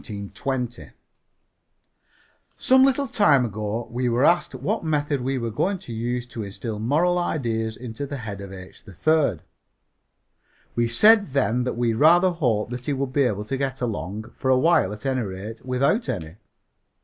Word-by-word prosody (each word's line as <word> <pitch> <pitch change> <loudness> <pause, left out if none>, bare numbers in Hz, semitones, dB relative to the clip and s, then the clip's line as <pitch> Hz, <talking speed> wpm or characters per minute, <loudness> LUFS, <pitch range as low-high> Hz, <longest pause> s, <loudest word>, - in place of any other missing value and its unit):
Some 260 0 +5
little 275 +1 +3
time 150 - +4
ago 110 +1 -4
we 125 +1 -1
were 120 +4 +2
asked 175 +1 +2
what 215 -2 -2
method 145 -3 0
we 135 +2 -1
were 115 -2 -3
going 190 - 0
to 150 -10 -9
use 120 +2 -2
to 120 -2 -6
instil 105 +2 -6
moral 160 +10 +2
ideas 115 -9 -2
into 125 +3 -6
the 140 0 -5
head 105 -5 -6
of 100 -1 -8
H. 95 -1 -11
3rd. 110 - +1 1.3
We 120 0 +1
said 205 - +5
then 125 -3 +1
that 125 - -3
we 120 -1 +1
rather 170 +9 +5
hoped 120 -10 0
that 125 0 -6
he 145 - +1
would 135 -1 -3
be 140 -1 +3
able 105 -3 -1
to 135 +5 -3
get 135 -1 -2
along, 110 -2 -4
for 130 - -1
a 130 - +5
while 160 - +3
at 105 +5 -9
any 130 -2 0
rate, 105 +2 -7
without 140 - 0
any. 85 -7 -4
125 Hz, 165 wpm, -24 LUFS, 110-145 Hz, 1.3 s, Some